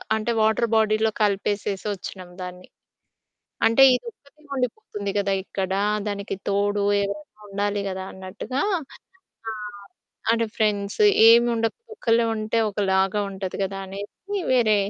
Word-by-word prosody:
అంటే, 220 +2 -1
వాటర్ 220 +2 +3
బాడీలో 220 0 +3
కలిపేసేసి 205 -1 0
వొచ్చినాం 185 -2 -7
దాన్ని. 180 0 -8 1.0
అంటే 230 +4 +4
ఇది 250 - -1
ఒక్కటి 305 -5 -25
ఉండిపోతుంది 250 - -3
కదా! 200 -1 +1
ఇక్కడ. 190 -1 -3 0.4
దానికి 200 -1 -3
తోడు 205 0 +1 0.2
ఎవరైనా 200 +1 -6
ఉండాలి 205 0 -1
కదా! 190 0 -4
అన్నట్టుగా. 190 +8 -4 0.9
ఆహ్, 210 -2 -8 0.5
అంటే 230 0 +1
ఫ్రెండ్స్ 205 - 0 0.3
ఏమి 235 +1 +7
ఉండదు, 225 0 0 0.2
ఒక్కలే 230 - +2
ఉంటే 215 +1 -1
ఒకలాగా 195 0 +1
ఉంటది 190 -1 -5
కదా! 195 0 -4
అనేసి. 200 +2 -7 0.4
వేరే 220 -4 +4
205 Hz, 120 wpm, -24 LUFS, 195-225 Hz, 1.0 s, ఏమి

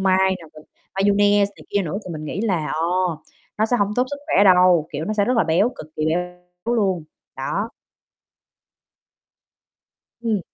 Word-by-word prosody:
mai 190 -1 +3 0.2
này, 155 -1 -14 0.3
mayonnaise 205 +1 +3
này - - -14
kia 200 -1 +1
nữa. 175 +4 -3
Thì 180 - -6
mình 155 -1 -6
nghĩ 170 +5 -4
là, 185 -9 0
ờ, 160 - -1 0.8
nó 220 - +3
sẽ 245 - +1
hông 205 -1 0
tốt 250 - +3
sức 285 - -3
khỏe 200 - +4
đâu, 180 -4 +5
kiểu, 150 +2 -3
nó 215 - -2
sẽ 205 -2 +2
rất 250 +2 +1
là 225 - +4
béo, 165 +8 +3
cực - - -8
kỳ 155 - 0
béo 180 +2 -2 0.3
luôn, 190 -7 +1 0.3
đó. 195 +11 -2 2.5
Ừm. 225 -4 0
190 Hz, 170 wpm, -22 LUFS, 165-205 Hz, 2.5 s, đâu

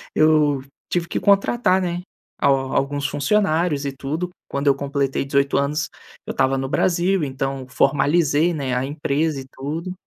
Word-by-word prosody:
eu 155 -3 +4 0.3
tive 175 -1 0
que - - -1
contratar, 200 -1 +3
né, 175 0 -2 0.4
al 135 -2 +2
alguns 140 +1 0
funcionários 155 0 +1
e 140 - -1
tudo. 145 +7 -4 0.2
Quando 140 +1 -3
eu 140 - +6
completei 140 -1 -1
18 140 0 +1
anos, 150 +2 0 0.4
eu - - -4
tava 135 0 +2
no 135 0 -3
Brasil. 180 +2 +1
Então 135 -1 -4
formalizei, 145 +5 +2
né, 135 -4 -2
a 125 +1 0
empresa 145 +1 -1
e 130 - -11
tudo. 160 +7 -5
145 Hz, 155 wpm, -22 LUFS, 135-170 Hz, 0.4 s, eu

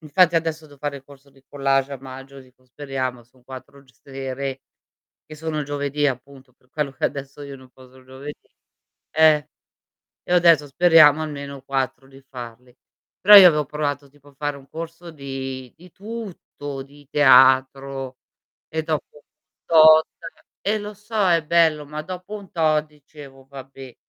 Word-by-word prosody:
Infatti 170 +3 +2
adesso 160 -1 -2
devo 145 - -18
fare 145 0 -4
il 135 - -22
corso 140 0 -18
di 135 - -25
collage 135 -1 0
a 135 - -6
maggio, 135 +1 -11
dico 130 0 -22
speriamo 130 -2 -5
son 125 +2 -28
4 135 +1 -12
g 130 - -25
sere, 135 +1 -6 0.7
che 155 - -11
sono 155 -1 -4
giovedì 145 0 -2
appunto 135 0 -6
per 125 0 -35
quello 150 -2 -3
che 130 - -6
adesso 140 0 -8
io 140 -1 -9
non 130 -1 -18
posso 130 0 -19
il 130 - -19
giovedì. 135 +3 -11 0.6
Eh. 155 -1 +3 0.8
E - - -12
io 180 - +5
adesso 165 -4 +4
speriamo 155 0 +5
almeno 140 -3 -7
4 135 -1 -3
di 135 0 -17
farli. 125 -1 -11 0.5
Però 205 +2 +9
io 190 -2 +11
avevo 150 -3 0
provato 145 -1 -4
tipo 145 0 -22
a 140 - -21
fare 145 +1 -4
un 135 -1 -16
corso 165 +3 -9
di 135 -3 -7
di 180 +2 -17
tutto, 190 -10 -8
di 145 +1 -18
teatro 135 -1 +3 0.5
e 160 0 -3
dopo 155 -1 -2
un - - -15 0.5
tot 160 -1 +7 0.6
eh 215 +2 0
lo 210 0 -8
so 210 -1 -1
è 165 -2 +2
bello, 160 -2 +2
ma 150 +1 -6
dopo 185 +4 -8
un 200 -3 -13
tot 155 -2 +1
dicevo: 145 -2 -16
"Vabbè", 135 -2 -12
140 Hz, 165 wpm, -22 LUFS, 135-155 Hz, 0.8 s, io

